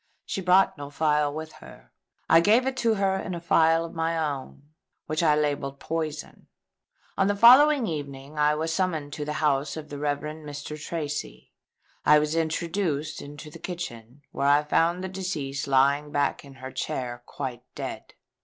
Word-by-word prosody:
She 195 - -3
brought 185 -3 +4
no 145 0 -6
phial 150 0 +1
with 155 +1 -6
her. - - -14 0.4
I 165 - +7
gave 220 +8 +4
it 265 0 -1
to 230 -3 +2
her 195 -1 +1
in 185 -1 -4
a - - -4
phial 165 -1 +3
of 165 - -9
my 165 0 -1
own, 145 -3 -4 0.4
which 155 +3 -1
I 155 -3 +4
labelled 145 -2 -1
Poison. 155 -2 -5 0.7
On 195 - +4
the 205 - +1
following 260 +5 +7
evening 145 -4 -6
I 150 0 +4
was 160 +1 -2
summoned 165 -5 -1
to 150 -2 -4
the 150 - -3
house 140 +1 +1
of 155 -1 -8
the 145 - -6
Rev. 145 -1 -1
Mr. 150 0 -7
Tracy. 145 - -5 0.5
I 150 - +6
was 150 +1 0
introduced 160 -2 -1
into 145 +2 -10
the 165 - -11
kitchen, 145 -7 -7
where 140 - -1
I 145 +1 +5
found 170 +4 +1
the - - -2
deceased 160 -8 -4
lying 140 +2 +3
back 145 0 0
in 140 -1 -13
her 130 0 -8
chair 120 -2 -4
quite 130 -4 -5
dead. - - -7
150 Hz, 175 wpm, -26 LUFS, 145-170 Hz, 0.7 s, I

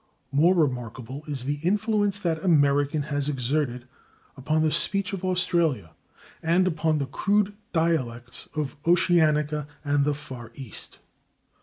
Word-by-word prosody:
More 165 +7 +4
remarkable 130 -3 -2
is 135 -4 -4
the 145 +1 -2
influence 205 +2 +1
that 165 -5 -2
American 145 -3 +3
has 145 -1 -2
exerted 130 -2 -1 0.5
upon 155 +4 0
the 155 - +2
speech 195 +4 -1
of 190 -1 -4
Australia 170 - 0 0.5
and 170 +3 +3
upon 160 -3 +1
the 140 - -1
crude 205 +8 +1 0.2
dialects 130 -8 -1
of 145 -1 -3
Oceanica 155 -4 +3 0.2
and 145 0 +2
the 145 0 +1
Far 130 -6 -9
East. 130 -6 -10
150 Hz, 130 wpm, -26 LUFS, 140-175 Hz, 0.5 s, More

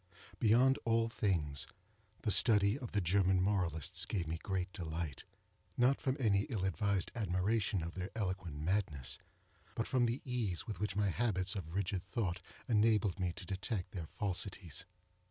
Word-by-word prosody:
—Beyond 125 +4 +5
all 115 0 +2
things, 80 -11 0 0.6
the - - +1
study 105 -1 +6
of 120 -4 -6
the 105 - +1
German 95 +1 +3
moralists 90 -6 +1
gave 90 -4 -1
me 80 +1 -3
great 95 -1 -2
delight; 80 - -4 0.5
not 125 +3 +3
from 130 -1 0
any 100 -5 +3
ill 105 -7 -1
advised 95 +1 0
admiration 100 -2 0
of 85 +1 -5
their 95 0 -4
eloquent 95 -7 -3
madness, 80 -5 -1 0.6
but 115 - 0
from 125 -2 +2
the 120 +4 -1
ease 115 -9 -2
with 105 -6 -5
which 105 -2 -2
my 105 -1 +2
habits 95 -3 0
of 90 -3 -5
rigid 100 -1 -1
thought 95 -4 -1 0.3
enabled 105 -4 +3
me 90 -1 0
to 95 +1 -9
detect 95 0 -3
their 85 -7 -5
falsities. 95 -3 -2
100 Hz, 155 wpm, -35 LUFS, 90-110 Hz, 0.6 s, study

